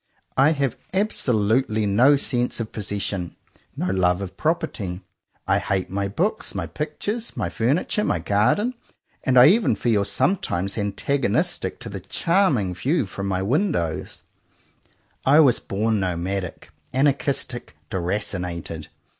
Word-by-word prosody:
I 140 Hz, +4 st, +5 dB
have 140 Hz, -5 st, -1 dB, 0.2 s
absolutely 115 Hz, -, +1 dB
no 120 Hz, +9 st, +5 dB
sense 125 Hz, -3 st, 0 dB
of 115 Hz, -2 st, -4 dB
possession, 100 Hz, -4 st, -3 dB, 0.4 s
no -, -, -1 dB
love 90 Hz, -1 st, +2 dB
of 95 Hz, -2 st, -6 dB
property. 115 Hz, -, -2 dB, 0.5 s
I -, -, +3 dB
hate 95 Hz, -2 st, -2 dB
my 100 Hz, +1 st, -1 dB
books, 185 Hz, -, -2 dB
my -, -, -2 dB
pictures, 210 Hz, +9 st, -4 dB
my -, -, -1 dB
furniture, 145 Hz, -, 0 dB
my -, -, +1 dB
garden; 105 Hz, -, +2 dB, 0.5 s
and 130 Hz, -1 st, +2 dB
I 125 Hz, -, +10 dB
even 215 Hz, +5 st, +3 dB
feel 110 Hz, -4 st, +1 dB
sometimes 100 Hz, -, 0 dB
antagonistic 115 Hz, -, -1 dB
to 115 Hz, -, -6 dB
the 100 Hz, -2 st, -5 dB
charming 130 Hz, -, +1 dB
view 135 Hz, -, 0 dB
from 100 Hz, +1 st, -5 dB
my 95 Hz, -1 st, 0 dB
windows, 125 Hz, -, -1 dB, 1.0 s
I 145 Hz, +4 st, +6 dB
was 140 Hz, -7 st, +5 dB
born 110 Hz, +2 st, 0 dB
nomadic, 90 Hz, 0 st, -3 dB, 0.2 s
anarchistic, 135 Hz, -, 0 dB, 0.2 s
deracinated. 90 Hz, -3 st, -3 dB
110 Hz, 125 wpm, -23 LUFS, 95-140 Hz, 1.0 s, I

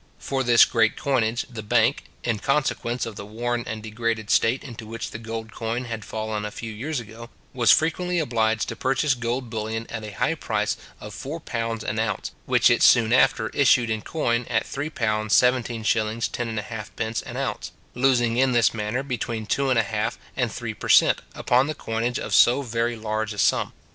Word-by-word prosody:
For 135 Hz, -1 st, -2 dB
this 120 Hz, -2 st, +7 dB
great 115 Hz, -2 st, +2 dB
coinage, 120 Hz, -4 st, 0 dB
the 115 Hz, -4 st, -7 dB
bank 105 Hz, -, +2 dB, 0.2 s
(in 115 Hz, -3 st, -1 dB
consequence 130 Hz, -2 st, 0 dB
of 110 Hz, -3 st, -7 dB
the -, -, -6 dB
worn 120 Hz, +3 st, -3 dB
and 110 Hz, 0 st, -5 dB
degraded 110 Hz, 0 st, -2 dB
state 115 Hz, +3 st, +3 dB
into 115 Hz, -5 st, -9 dB
which 115 Hz, +1 st, -6 dB
the 115 Hz, -, -7 dB
gold 115 Hz, 0 st, -6 dB
coin 115 Hz, +3 st, -3 dB
had 110 Hz, -2 st, -5 dB
fallen 110 Hz, 0 st, -4 dB
a 105 Hz, -, -3 dB
few 110 Hz, +1 st, -7 dB
years 135 Hz, +7 st, -3 dB
ago) 115 Hz, +1 st, -10 dB, 0.2 s
was 120 Hz, -3 st, +4 dB
frequently 180 Hz, +3 st, +2 dB
obliged 115 Hz, -7 st, +1 dB
to 115 Hz, -, -5 dB
purchase 135 Hz, +4 st, +1 dB
gold 120 Hz, 0 st, -3 dB
bullion 110 Hz, 0 st, -3 dB
at 110 Hz, -, -4 dB
the 105 Hz, -1 st, -7 dB
high -, -, +1 dB
price -, -, -1 dB, 0.2 s
of 105 Hz, 0 st, -9 dB
four 140 Hz, -, -6 dB
pounds 115 Hz, -5 st, -3 dB
an 110 Hz, -, -2 dB
ounce, 110 Hz, -1 st, -2 dB, 0.2 s
which -, -, +4 dB
it -, -, +2 dB
soon 115 Hz, -1 st, +5 dB
after 135 Hz, +2 st, +3 dB
issued 120 Hz, -4 st, +3 dB
in 110 Hz, -1 st, -1 dB
coin 120 Hz, -5 st, -1 dB
at 115 Hz, -2 st, +1 dB
£3:17:10 120 Hz, -3 st, +1 dB
1/2 110 Hz, 0 st, -2 dB
an -, -, -6 dB
ounce, -, -, -3 dB, 0.2 s
losing 120 Hz, -2 st, +2 dB
in 130 Hz, 0 st, +3 dB
this 120 Hz, -1 st, +4 dB
manner 110 Hz, +4 st, -2 dB
between 120 Hz, -4 st, -3 dB
two 140 Hz, +5 st, 0 dB
and 130 Hz, -, +3 dB
a 115 Hz, -, +4 dB
half 105 Hz, +1 st, -2 dB, 0.2 s
and -, -, 0 dB
three -, -, -5 dB
per -, -, -7 dB
cent. -, -, +5 dB
upon 125 Hz, +3 st, +2 dB
the 155 Hz, -, -3 dB
coinage 115 Hz, +1 st, -2 dB
of -, -, -4 dB
so 125 Hz, +4 st, +5 dB
very 115 Hz, -1 st, -1 dB
large 110 Hz, -1 st, -3 dB
a -, -, -11 dB
sum. -, -, +2 dB
115 Hz, 190 wpm, -24 LUFS, 110-125 Hz, 0.2 s, this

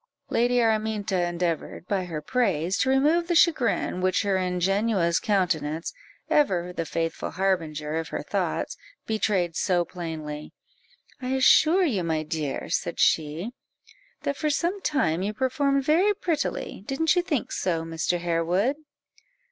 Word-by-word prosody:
Lady 245 Hz, +1 st, +2 dB
Araminta 215 Hz, -5 st, +1 dB
endeavoured, 175 Hz, -1 st, -3 dB
by 195 Hz, -3 st, -1 dB
her 155 Hz, -4 st, -5 dB
praise, 190 Hz, -6 st, 0 dB
to 260 Hz, -, +2 dB
remove 300 Hz, +6 st, +3 dB
the 350 Hz, -, +1 dB
chagrin 260 Hz, -, +2 dB
which 185 Hz, +3 st, +2 dB
her 200 Hz, -1 st, +1 dB
ingenuous 185 Hz, 0 st, +1 dB
countenance 165 Hz, -6 st, 0 dB, 0.3 s
(ever 180 Hz, -11 st, +1 dB
the 165 Hz, -2 st, -3 dB
faithful 165 Hz, 0 st, -2 dB
harbinger 160 Hz, -5 st, -1 dB
of 165 Hz, -, -3 dB
her -, -, -4 dB
thoughts) -, -, -2 dB, 0.3 s
betrayed 195 Hz, -6 st, 0 dB
so 175 Hz, -2 st, +1 dB
plainly 155 Hz, -4 st, -6 dB, 0.7 s
"I 255 Hz, +1 st, -1 dB
assure 315 Hz, +7 st, +5 dB
you, 210 Hz, -, 0 dB
my 160 Hz, -2 st, -1 dB
dear," 155 Hz, -3 st, -3 dB
said -, -, -2 dB
she, 160 Hz, +8 st, +1 dB, 0.7 s
"that 280 Hz, -, -2 dB
for 305 Hz, -, 0 dB
some 345 Hz, +7 st, 0 dB
time 185 Hz, -, +1 dB
you 210 Hz, +2 st, -2 dB
performed 275 Hz, +2 st, +1 dB
very 360 Hz, +9 st, +3 dB
prettily; 335 Hz, -, -2 dB
didn't 320 Hz, +6 st, +2 dB
you 355 Hz, -, +3 dB
think 320 Hz, -, -2 dB
so, 165 Hz, -3 st, -1 dB
Mr. 165 Hz, +2 st, -1 dB
Harewood?" 175 Hz, -, 0 dB
190 Hz, 140 wpm, -26 LUFS, 165-260 Hz, 0.7 s, assure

